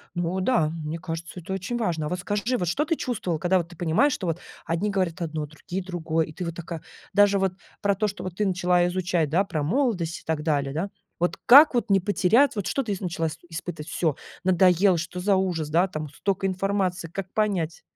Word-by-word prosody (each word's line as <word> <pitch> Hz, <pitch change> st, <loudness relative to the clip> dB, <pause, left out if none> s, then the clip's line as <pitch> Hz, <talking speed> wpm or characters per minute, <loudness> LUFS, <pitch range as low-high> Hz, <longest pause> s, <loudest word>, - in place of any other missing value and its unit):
Ну 175 Hz, +2 st, -1 dB
да, 185 Hz, -8 st, +2 dB
мне 155 Hz, +2 st, -3 dB
кажется, 170 Hz, 0 st, -6 dB
это 180 Hz, +3 st, -6 dB
очень 195 Hz, +6 st, -3 dB
важно. 165 Hz, -9 st, -1 dB
А -, -, -4 dB
вот 180 Hz, -, -2 dB
скажи, 205 Hz, +6 st, -1 dB
вот 180 Hz, -, -2 dB
что 270 Hz, -, +1 dB
ты 330 Hz, +1 st, +1 dB
чувствовала, 190 Hz, -, -2 dB
когда 180 Hz, +3 st, +3 dB
вот 170 Hz, -1 st, -5 dB
ты 175 Hz, -, -14 dB
понимаешь, 175 Hz, -, +3 dB
что 185 Hz, -, -3 dB
вот 165 Hz, +1 st, -1 dB, 0.3 s
одни 170 Hz, +5 st, 0 dB
говорят 185 Hz, -3 st, -1 dB
одно, 155 Hz, -2 st, -2 dB
другие- 165 Hz, +5 st, -6 dB
другое, 165 Hz, -3 st, -1 dB
и 155 Hz, -, -11 dB
ты 180 Hz, -, -5 dB
вот 170 Hz, -1 st, -4 dB
такая: 170 Hz, -1 st, -6 dB, 0.3 s
даже 205 Hz, -1 st, +5 dB
вот 190 Hz, -1 st, +1 dB, 0.3 s
про 200 Hz, -1 st, +2 dB
то, 215 Hz, +2 st, +1 dB
что 200 Hz, -1 st, -6 dB
вот 185 Hz, -2 st, -5 dB
ты 210 Hz, +2 st, 0 dB
начала 180 Hz, -1 st, +2 dB
изучать, 175 Hz, -3 st, 0 dB
да, 175 Hz, +6 st, +3 dB
про 155 Hz, -6 st, -2 dB
молодость 180 Hz, -, 0 dB
и -, -, -20 dB
так 160 Hz, -2 st, -1 dB
далее, 140 Hz, -3 st, 0 dB
да. 170 Hz, +7 st, -2 dB, 0.3 s
Вот 175 Hz, +1 st, 0 dB
как 280 Hz, +2 st, +9 dB
вот 235 Hz, -2 st, 0 dB
не 195 Hz, -, +6 dB
потерять 210 Hz, +8 st, +3 dB
вот 205 Hz, -3 st, -2 dB
что 275 Hz, -, 0 dB
ты 220 Hz, -, -4 dB
ис 190 Hz, -, -5 dB
начала 165 Hz, -3 st, -2 dB
с 155 Hz, -, -8 dB
испытывать? 165 Hz, -1 st, -6 dB
Всё, 160 Hz, -5 st, 0 dB, 0.3 s
надоело, 185 Hz, 0 st, +4 dB
что 170 Hz, +2 st, -4 dB
за 195 Hz, +2 st, +3 dB
ужас, 175 Hz, -5 st, -1 dB
да, 170 Hz, +5 st, +3 dB
там 155 Hz, -4 st, -5 dB
столько 195 Hz, +6 st, -2 dB
информации. 190 Hz, -2 st, -1 dB
Как 190 Hz, +3 st, -6 dB
понять? 190 Hz, -7 st, 0 dB
180 Hz, 225 wpm, -25 LUFS, 165-195 Hz, 0.3 s, как